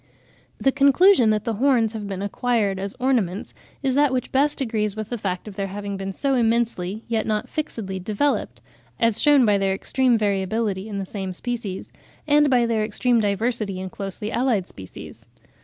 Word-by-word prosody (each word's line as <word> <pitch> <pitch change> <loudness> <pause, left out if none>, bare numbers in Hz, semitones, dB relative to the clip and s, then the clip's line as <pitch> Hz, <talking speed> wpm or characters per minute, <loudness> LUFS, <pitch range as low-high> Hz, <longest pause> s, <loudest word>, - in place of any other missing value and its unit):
The 270 - +2
conclusion 280 - +5
that 215 -1 +1
the 230 - -1
horns 235 -1 +2
have 215 -2 -5
been 195 -1 -4
acquired 205 -2 0
as 195 +1 -4
ornaments 230 -8 0 0.3
is 265 -1 +1
that 285 0 +3
which 255 -1 -2
best 285 +2 +2
agrees 215 -5 -1
with 215 -1 -5
the 240 - -3
fact 185 0 -3
of 205 - -8
their 195 -1 -2
having 200 +1 -5
been 195 0 -4
so 275 +8 0
immensely, 225 -4 0
yet 225 -2 -1
not 215 -1 -1
fixedly, 215 -11 -4
developed,—as 190 - -2
shewn 290 -4 +5
by 205 -2 +3
their 195 -1 +1
extreme 255 +4 +2
variability 205 0 -1
in 205 - -4
the 195 - -3
same 190 -1 -5
species, 225 -2 -5 0.3
and 295 0 +4
by 245 -2 +3
their 225 -2 0
extreme 235 +3 +1
diversity 210 -1 -1
in 185 0 -6
closely 200 +2 -5
allied 235 -7 +1
species. 95 -1 -9
215 Hz, 175 wpm, -23 LUFS, 195-245 Hz, 0.3 s, conclusion